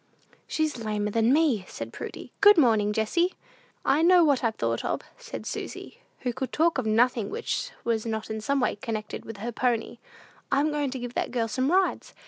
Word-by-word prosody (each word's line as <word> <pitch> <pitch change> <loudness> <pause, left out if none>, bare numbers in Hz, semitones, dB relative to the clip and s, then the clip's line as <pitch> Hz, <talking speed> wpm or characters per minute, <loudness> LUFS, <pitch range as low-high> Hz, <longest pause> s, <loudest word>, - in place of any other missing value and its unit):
"She's 310 -5 -1
lamer 210 -1 -1
than 225 +2 +3
me," 285 - +3
said - - -7
Prudy. - - -8
"Good 410 -1 +8
morning, 220 -8 +4
Jessie." 280 - +1 0.5
"I 285 +3 +3
know 350 +1 +6
what 285 -5 +3
I've 225 -2 +1
thought 115 0 -1
of," - - -1 0.2
said - - -7
Susy, 475 - -6 0.2
who 250 -2 -1
could 260 +1 -4
talk 325 -2 +2
of 235 - -2
nothing 225 -1 +2
which - - -3
was 230 -2 0
not 220 0 -3
in 220 0 -3
some 275 +6 +1
way 250 - 0
connected 215 0 -5
with 225 - -8
her 230 +4 -4
pony. 240 -1 -1 0.5
"I'm 285 +3 +2
going 295 -2 -1
to 260 - -4
give 245 -1 -6
that - - -1
girl 235 -2 -1
some 255 +6 0
rides. 380 +1 +1
245 Hz, 195 wpm, -27 LUFS, 220-295 Hz, 0.5 s, Good